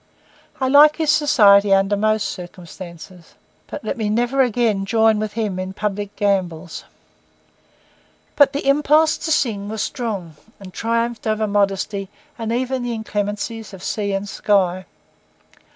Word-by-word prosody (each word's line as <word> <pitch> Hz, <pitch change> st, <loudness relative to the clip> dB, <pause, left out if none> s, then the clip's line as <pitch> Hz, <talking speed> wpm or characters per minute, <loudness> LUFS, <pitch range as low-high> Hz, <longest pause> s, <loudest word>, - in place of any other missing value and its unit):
I 260 Hz, -, 0 dB
like 295 Hz, +3 st, +6 dB
his 315 Hz, -2 st, +1 dB
society 205 Hz, -10 st, +5 dB
under 195 Hz, +1 st, +1 dB
most 215 Hz, +1 st, +1 dB
circumstances, 175 Hz, -1 st, -11 dB, 0.3 s
but 290 Hz, -, -8 dB
let -, -, -3 dB
me 215 Hz, -2 st, -1 dB
never 240 Hz, +5 st, +1 dB
again 230 Hz, -5 st, +1 dB
join 220 Hz, +1 st, +2 dB
with 215 Hz, -1 st, -3 dB
him 210 Hz, -5 st, -2 dB
in 185 Hz, 0 st, -5 dB
public 205 Hz, 0 st, -4 dB
gambols. 185 Hz, -5 st, -2 dB, 1.5 s
But 285 Hz, -, +5 dB
the 280 Hz, -, -4 dB
impulse 300 Hz, +3 st, +3 dB
to 320 Hz, -, -3 dB
sing 210 Hz, -8 st, 0 dB
was 220 Hz, -1 st, -3 dB
strong, 200 Hz, -, -5 dB, 0.2 s
and 190 Hz, -2 st, -11 dB
triumphed 230 Hz, +1 st, -2 dB
over 215 Hz, 0 st, 0 dB
modesty 200 Hz, -1 st, -1 dB, 0.3 s
and 225 Hz, -1 st, -4 dB
even 255 Hz, +2 st, -1 dB
the 245 Hz, -1 st, -3 dB
inclemencies 210 Hz, 0 st, -4 dB
of 185 Hz, -, -13 dB
sea 205 Hz, -2 st, -2 dB
and 195 Hz, +1 st, -3 dB
sky. 185 Hz, -3 st, 0 dB
210 Hz, 140 wpm, -20 LUFS, 195-235 Hz, 1.5 s, like